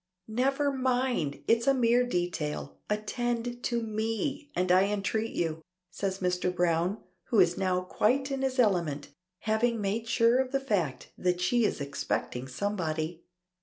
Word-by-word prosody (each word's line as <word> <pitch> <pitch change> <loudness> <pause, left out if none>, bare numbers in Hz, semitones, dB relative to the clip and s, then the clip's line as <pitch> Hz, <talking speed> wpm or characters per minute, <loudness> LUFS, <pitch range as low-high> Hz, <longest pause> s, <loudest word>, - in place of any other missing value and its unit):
"Never 270 +5 +1
mind! 250 - 0
It's 230 +2 +3
a 275 - +5
mere 240 0 +4
detail; 175 -7 -2
attend 240 +3 -2
to 235 -1 0
me 225 +7 -2
and 180 0 +1
I 185 +2 +6
entreat 210 +2 -1
you," 160 -1 -1 0.3
says 190 +2 -2
Mr. 180 0 +1
Browne, 175 +2 +1 0.3
who 225 - +2
is 175 -2 +5
now 185 -1 +1
quite 255 +9 +1
in 270 -1 -2
his 265 0 -1
element, 170 - +1 0.3
having 225 +2 +1
made 210 +3 -1
sure 230 +2 +4
of 260 -1 0
the 275 - +3
fact 195 - -2
that 180 -1 +1
she 230 +6 +2
is - - -1
expecting 140 -2 -3
somebody. 165 0 -2
210 Hz, 150 wpm, -29 LUFS, 175-240 Hz, 0.3 s, I